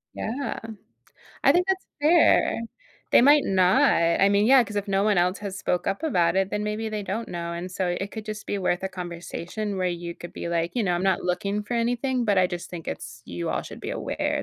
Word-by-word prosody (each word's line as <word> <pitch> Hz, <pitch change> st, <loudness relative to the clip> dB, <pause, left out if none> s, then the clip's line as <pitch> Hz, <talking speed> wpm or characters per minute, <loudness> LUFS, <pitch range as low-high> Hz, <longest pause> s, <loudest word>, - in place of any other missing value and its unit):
Yeah. 255 Hz, +6 st, -3 dB, 0.9 s
I -, -, +7 dB
think 360 Hz, +1 st, +2 dB
that's 380 Hz, 0 st, -1 dB
fair. 310 Hz, -5 st, +4 dB, 0.5 s
They -, -, +8 dB
might 290 Hz, +2 st, +6 dB
not. 195 Hz, +8 st, +4 dB, 0.3 s
I 195 Hz, -, +6 dB
mean, 200 Hz, +1 st, +3 dB
yeah, 260 Hz, +1 st, +7 dB
'cause 210 Hz, -, -9 dB
if 205 Hz, 0 st, -2 dB
no 195 Hz, 0 st, +2 dB
one 210 Hz, -1 st, +3 dB
else 180 Hz, +2 st, +1 dB
has 200 Hz, -2 st, -6 dB
spoke 180 Hz, -, -1 dB
up 195 Hz, -, -1 dB
about 175 Hz, -, +2 dB
it, 190 Hz, 0 st, +1 dB
then 210 Hz, -, -2 dB
maybe 210 Hz, +1 st, -2 dB
they 215 Hz, -1 st, -3 dB
don't 215 Hz, +4 st, -3 dB
know, 170 Hz, -1 st, -4 dB
and 175 Hz, +2 st, -5 dB
so, 180 Hz, -1 st, -1 dB
it 195 Hz, +1 st, -4 dB
could 220 Hz, -2 st, -7 dB
just 215 Hz, 0 st, -6 dB
be 205 Hz, -, -2 dB
worth 180 Hz, -1 st, 0 dB
a 190 Hz, -, -1 dB
conversation 180 Hz, +3 st, -5 dB
where 185 Hz, -, 0 dB
you 175 Hz, -1 st, -4 dB
could 175 Hz, -, -10 dB
be -, -, -5 dB
like, 170 Hz, 0 st, -1 dB
"You 245 Hz, -, +1 dB
know, 185 Hz, -4 st, +1 dB
I'm 175 Hz, -, -1 dB
not 190 Hz, -2 st, +2 dB
looking 200 Hz, +3 st, -1 dB
for 225 Hz, +4 st, -4 dB
anything, 245 Hz, +2 st, 0 dB
but 205 Hz, -3 st, +2 dB
I 185 Hz, -, +5 dB
just 175 Hz, -1 st, -6 dB
think 170 Hz, -2 st, -7 dB
it's 115 Hz, 0 st, -7 dB
you 85 Hz, -1 st, -5 dB
all -, -, -1 dB
should -, -, -10 dB
be -, -, -5 dB
aware -, -, -2 dB
195 Hz, 235 wpm, -25 LUFS, 175-225 Hz, 0.9 s, They